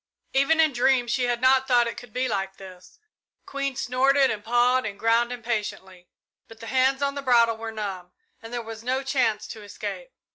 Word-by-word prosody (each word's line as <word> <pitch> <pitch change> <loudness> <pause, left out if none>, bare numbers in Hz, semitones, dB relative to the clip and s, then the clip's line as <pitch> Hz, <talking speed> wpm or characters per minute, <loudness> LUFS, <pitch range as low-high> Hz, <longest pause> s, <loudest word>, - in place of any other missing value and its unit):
Even 275 +4 +3
in 310 -3 +4
dreams 245 -1 +2
she 250 0 +1
had 240 -1 0
not 260 0 +4
thought 245 -2 +4
it 230 - -4
could 245 -2 -11
be 255 +3 -1
like 195 -3 -3
this. 185 -2 -13 0.5
Queen 275 -1 -3
snorted 265 +1 +2
and 210 -2 -5
pawed 245 +3 +2
the 210 - -4
ground 230 +3 +1
impatiently, 210 -6 -5 0.4
but 225 0 -15
the 230 - -9
hands 265 +3 +1
on 280 0 0
the 280 - -5
bridle 235 -3 +4
were 225 0 -6
numb, 195 -5 -6 0.3
and 225 - -10
there 240 -1 -4
was 225 0 -9
no 260 +2 -1
chance 240 -6 0
to 220 - -9
escape. - - -7
240 Hz, 195 wpm, -25 LUFS, 220-265 Hz, 0.5 s, in